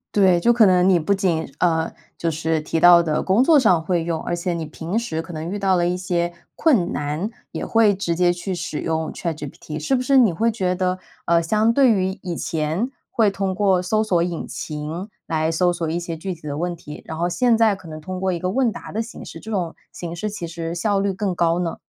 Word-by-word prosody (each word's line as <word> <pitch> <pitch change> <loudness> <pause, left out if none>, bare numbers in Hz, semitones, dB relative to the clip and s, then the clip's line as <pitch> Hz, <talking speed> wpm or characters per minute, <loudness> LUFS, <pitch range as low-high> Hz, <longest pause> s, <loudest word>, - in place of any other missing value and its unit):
对， 185 -4 +5
就 240 +7 +4
可 230 -2 +6
能 180 -1 +4
你 180 - +5
不 170 +5 +1
仅， 180 -5 0
呃， 165 -2 +1 0.3
就 165 -1 -1
是 160 0 -1
提 160 +1 -2
到 175 0 +8
的 155 -2 0
工 200 +7 +3
作 305 0 +6
上 180 -9 +3
会 170 -1 0
用， 165 -2 -2
而 175 - -3
且 175 +1 -1
你 165 -2 -3
平 165 +6 -4
时 165 -9 -2
可 165 +1 -10
能 160 +3 -5
遇 205 - -3
到 190 -1 +2
了 175 -1 +2
一 180 - -1
些 175 -2 -1 0.2
困 250 - +2
难， 150 +8 -2 0.2
也 - - -4
会 225 -3 +4
直 175 -3 -2
接 175 0 +3
去 175 +1 -4
使 170 -3 -4
用 160 -1 -2
ChatGPT。 155 -2 -5
是 155 - -1
不 250 - +2
是 275 +2 +2
你 235 -8 +6
会 225 +8 +1
觉 185 -5 0
得， 185 0 -1 0.3
呃， 170 0 +3
相 215 +6 +2
对 265 -3 +5
于 190 -2 0
以 175 -3 -4
前 160 - -1 0.2
会 220 -3 +3
通 195 -1 -2
过 190 -2 +2
搜 215 +4 +1
索 180 -6 +2
引 175 -2 -3
擎 155 +6 -5 0.2
来 160 0 0
搜 175 +2 +2
索 165 -2 -3
一 170 +2 -1
些 170 -1 -5
具 185 +3 -4
体 155 -3 -11
的 145 - -3
问 175 +1 -1
题， 150 -2 -10
然 160 - -6
后 175 +1 +1
现 235 +5 +2
在 220 -3 +4
可 180 -4 -13
能 155 0 -7
通 185 +3 -6
过 190 -1 +1
一 170 - -2
个 185 - -1
问 250 -1 +2
答 - - -9
的 220 - 0
形 230 - -8
式， - - -10
这 220 - -8
种 175 -5 -2 0.2
形 170 -1 -6
式 210 +4 -3
其 180 -5 -5
实 165 0 -5
效 195 +3 0
率 200 0 +1
更 190 -1 -2
高 170 0 +2
呢？ 170 -2 -2
175 Hz, 280 characters per minute, -22 LUFS, 165-200 Hz, 0.3 s, 到